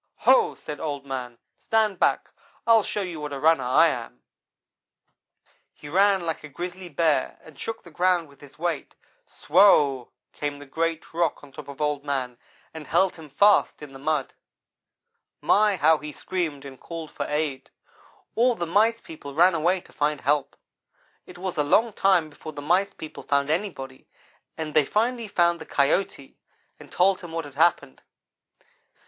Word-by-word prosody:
"'Ho!' 475 -3 +4
said 150 -2 -8
Old 145 -3 -4
man, 125 -3 -5 0.2
'stand 215 -4 +1
back! - - +1 0.3
I'll 230 -1 +6
show 205 0 -3
you 175 -4 -6
what 150 -1 -5
a 140 - -4
runner 155 -2 +3
I 160 +7 +5
am.' 115 - -6 1.5
"He 145 - -11
ran 195 +1 +3
like 165 -2 -3
a 150 - -9
grizzly 180 +4 -7
bear, 150 -3 0
and 155 -3 -16
shook 225 0 -5
the 170 - -14
ground 175 0 +1
with 140 -1 -21
his 145 -1 -15
weight. 170 -2 -3 0.3
Swow! 145 -7 +3 0.2
came 145 -1 -4
the 145 - -11
great 165 +4 -3
rock 165 -3 -1
on 145 - -14
top 150 +1 -10
of 140 -1 -10
Old 150 -1 -1
man 130 -4 -3 0.3
and 160 -2 -9
held 190 -2 +2
him 160 -2 -12
fast 200 +1 +3
in 140 -2 -10
the 135 - -11
mud. 150 -1 -1 1.1
My! 210 -1 +3
how 160 -2 +4
he 150 0 -7
screamed 155 -4 -4
and 135 -2 -10
called 165 -2 -8
for - - -4
aid. 150 -2 -2 0.6
All 240 +1 +3
the 175 - -3
Mice 220 +7 +2
people 140 -3 -10
ran 175 +3 +5
away 175 +3 +1
to - - -20
find 150 0 -1
help. 145 +2 0 0.7
It - - -12
was 185 -1 -5
a 150 - +2
long 220 +10 +2
time 180 -6 +2
before 155 +1 -10
the 145 - -7
Mice 190 +6 +1
people 155 - -9
found 140 +1 0
anybody, 155 -8 -4 0.5
but 155 -2 -5
they 155 - +5
finally 230 - -1
found 170 -3 +1
the - - -7
Coyote, 140 0 -1 0.4
and - - -14
told 190 +1 +2
him 175 -2 -9
what 165 -2 -3
had 145 - -11
happened. 155 - +1
160 Hz, 175 wpm, -25 LUFS, 145-180 Hz, 1.5 s, I'll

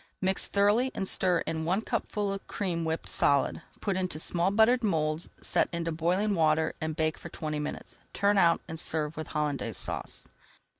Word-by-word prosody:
Mix 190 0 0
thoroughly 210 +6 +3
and 195 - -1
stir 180 -3 +2
in 160 -1 -3
one 185 +6 +1
cupful 205 -2 -2
of 195 - -7
cream 175 -4 -2
whipped 160 0 -2
solid. 140 -1 +2 0.2
Put 200 -2 0
into 185 -4 -2
small 175 +3 +2
buttered 225 +4 +4
moulds, 155 -4 0
set - - +2
into 170 -1 -2
boiling 180 +6 +1
water, 160 -2 +2
and 160 -1 -2
bake 155 -1 0
for - - -8
twenty 150 -1 -4
minutes. 150 - -6
Turn 200 0 +2
out 170 -2 +4
and 160 0 -6
serve 155 -1 0
with 155 -1 -5
Hollandaise 145 -8 -2
Sauce. - - -3
170 Hz, 180 wpm, -29 LUFS, 155-195 Hz, 0.2 s, buttered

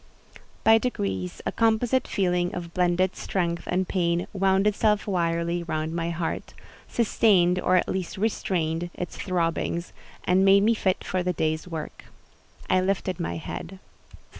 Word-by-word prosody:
By 225 0 +6
degrees, 95 - -3
a - - 0
composite 230 +3 +2
feeling 180 -2 0
of 170 -1 -6
blended 180 +1 +1
strength 170 -3 -2
and 185 +1 0
pain 170 -2 0
wound 195 0 +2
itself 210 0 +2
wirily 170 -2 0
round 155 -1 -3
my 170 0 -1
heart, 170 -1 -4 0.3
sustained, 190 -6 +3
or 185 - +2
at 180 - +2
least 190 0 -3
restrained, 175 -5 -1
its 180 - -5
throbbings, 170 -1 -1 0.3
and 185 +1 +3
made 195 +1 +6
me 225 +2 +4
fit 190 -4 0
for 185 - -1
the 180 0 -1
day's 155 +1 -1
work. 160 -3 -7 0.6
I 185 - +3
lifted 190 0 -1
my 170 - -2
head. 170 +3 -7
180 Hz, 145 wpm, -26 LUFS, 170-195 Hz, 0.6 s, By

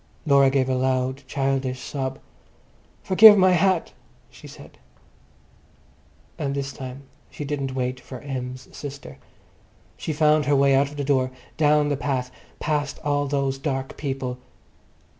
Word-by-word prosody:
Laura 140 -2 +5
gave 135 -1 +1
a 130 - 0
loud 130 +1 0
childish 135 -2 -1
sob. 135 -1 -4 0.9
"Forgive 210 +2 +8
my 185 -1 +5
hat," 180 0 +2 0.4
she - - -13
said. - - -14 1.6
And 140 -2 -2
this 135 -1 -3
time 130 +1 -8 0.3
she 150 - -7
didn't 140 -2 -3
wait 125 0 -2
for 130 - -10
Em's 130 -2 -6
sister. 140 -2 -9 0.8
She - - -4
found 150 -1 +3
her 145 - +3
way 140 0 +4
out 135 +1 +3
of 145 - -11
the 145 - -2
door, 130 -2 +1 0.3
down 150 -1 +3
the 145 - 0
path, 130 -3 -2 0.3
past 145 -2 -1
all 145 -1 0
those 135 -1 -1
dark 135 -2 -3
people. 135 -3 -4
140 Hz, 140 wpm, -24 LUFS, 130-145 Hz, 1.6 s, Forgive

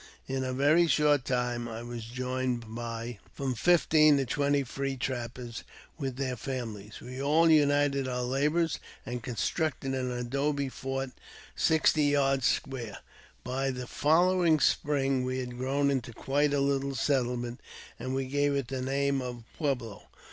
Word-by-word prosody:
In 135 0 -2
a 130 - -2
very 145 +6 +4
short 150 -4 +3
time 125 -1 -1
I 115 +1 -6
was 120 -1 -6
joined 125 -1 -3
by 115 -1 -5
from 135 -2 -2
fifteen 155 +1 +5
to 135 - +1
twenty 140 +2 +1
free 135 +1 -3
trappers, 120 -2 -4 0.4
with 135 -3 -3
their 130 -1 -2
families. 115 -5 -6
We 130 +2 -7
all 160 +4 +4
united 145 -2 +3
our 125 -1 -2
labours, 150 +6 +1 0.3
and 125 -1 -4
constructed 135 +4 -1
an 130 -1 -1
adobe 140 +3 -1
fort 135 0 -4 0.4
sixty 155 -1 +3
yards 135 -2 +3
square. 125 -5 -2 0.5
By 135 +2 -1
the 125 -1 -4
following 170 +3 +3
spring 135 -2 +2
we 130 0 -2
had 125 -1 -5
grown 140 +2 +1
into 130 -3 -2
quite 145 +5 +1
a 145 -1 +1
little 140 0 0
settle 125 0 +1
ment, 120 +2 -5 0.4
and 130 +1 -3
we 135 0 -1
gave 145 +2 +1
it 135 -4 -2
the 130 -1 -3
name 140 +1 0
of 125 -2 -6
Pueblo. 125 -9 -3
135 Hz, 155 wpm, -29 LUFS, 125-145 Hz, 0.5 s, fifteen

